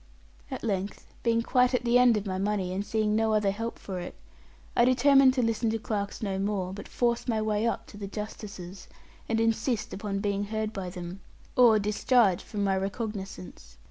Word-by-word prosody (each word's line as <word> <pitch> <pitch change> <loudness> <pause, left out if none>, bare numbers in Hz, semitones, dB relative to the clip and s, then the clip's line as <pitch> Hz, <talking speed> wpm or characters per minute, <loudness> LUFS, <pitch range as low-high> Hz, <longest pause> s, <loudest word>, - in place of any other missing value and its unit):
At - - -6
length, 200 -3 -2 0.2
being 230 -1 +2
quite 250 +1 +3
at 245 0 -1
the 240 +1 +5
end 245 -3 +5
of 205 - -3
my 185 -1 -2
money, 195 -2 -1
and 195 +2 -2
seeing 215 0 0
no 220 0 +2
other 210 -2 +2
help 225 +3 -4
for 190 -2 -6
it, 175 - -7 0.6
I 235 - +5
determined 265 +1 +5
to 250 - +2
listen 230 0 +1
to 225 - 0
clerks 205 -1 -3
no 195 -2 -1
more, 195 -2 -1
but 200 - -8
force 240 0 0
my 225 -2 +1
way 215 +1 0
up - - -2
to - - -10
the 200 -1 -5
Justices, 200 -3 -7 0.4
and 225 0 +1
insist 225 +1 0
upon 200 0 -3
being 200 0 -1
heard 220 +1 -3
by 190 -3 -4
them, 180 +1 -7 0.3
or 240 -4 +7
discharged 210 -1 +3
from 205 -2 -4
my 195 -1 +2
recognisance. 195 - -5
210 Hz, 195 wpm, -28 LUFS, 195-230 Hz, 0.6 s, or